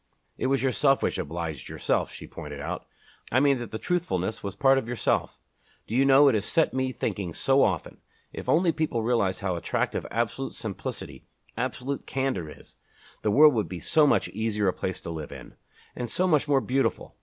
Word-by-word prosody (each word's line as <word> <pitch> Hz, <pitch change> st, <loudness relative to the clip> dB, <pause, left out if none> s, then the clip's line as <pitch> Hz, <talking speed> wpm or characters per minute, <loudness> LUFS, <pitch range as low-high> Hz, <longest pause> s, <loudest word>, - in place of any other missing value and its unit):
"It -, -, -1 dB
was 135 Hz, 0 st, +1 dB
yourself 135 Hz, +2 st, +3 dB
which -, -, 0 dB
obliged 80 Hz, -2 st, -4 dB
yourself," -, -, -1 dB
she -, -, -9 dB
pointed 75 Hz, -3 st, -8 dB
out, 70 Hz, -, -5 dB, 0.4 s
"I 130 Hz, -, +4 dB
mean 140 Hz, -2 st, +3 dB
that 120 Hz, -, -6 dB
the 110 Hz, -, -4 dB
truthfulness 110 Hz, -, -1 dB
was 100 Hz, -1 st, -5 dB
part 135 Hz, +5 st, +4 dB
of 115 Hz, -, -7 dB
yourself. 120 Hz, -4 st, 0 dB, 0.5 s
Do -, -, -7 dB
you 135 Hz, +3 st, +4 dB
know, 140 Hz, +1 st, +7 dB
it 135 Hz, -, +5 dB
has 105 Hz, -3 st, +1 dB
set 160 Hz, +8 st, +1 dB
me 130 Hz, 0 st, 0 dB
thinking 100 Hz, -7 st, -3 dB
so 135 Hz, +1 st, +3 dB
often. 90 Hz, -6 st, 0 dB, 0.3 s
If -, -, -6 dB
only 170 Hz, +1 st, +4 dB
people 150 Hz, -7 st, -1 dB
realized 110 Hz, -5 st, +1 dB
how 95 Hz, -2 st, -1 dB
attractive 85 Hz, -, -2 dB
absolute -, -, -2 dB
simplicity, -, -, -6 dB, 0.3 s
absolute 130 Hz, +3 st, -3 dB
candor 130 Hz, -, -1 dB
is, -, -, -15 dB, 0.4 s
the 105 Hz, -, 0 dB
world 150 Hz, +7 st, +7 dB
would 110 Hz, -3 st, -1 dB
be 90 Hz, -, -5 dB
so 150 Hz, -, +3 dB
much 110 Hz, -8 st, +3 dB
easier 105 Hz, -1 st, -1 dB
a 90 Hz, -, +2 dB
place 95 Hz, -, -3 dB
to 85 Hz, -, -6 dB
live 80 Hz, -3 st, -6 dB
in, -, -, -10 dB, 0.4 s
and 120 Hz, -1 st, -4 dB
so 185 Hz, -, 0 dB
much 150 Hz, -4 st, +3 dB
more 140 Hz, -2 st, +3 dB
beautiful! 135 Hz, +2 st, -1 dB
120 Hz, 195 wpm, -27 LUFS, 95-135 Hz, 0.5 s, know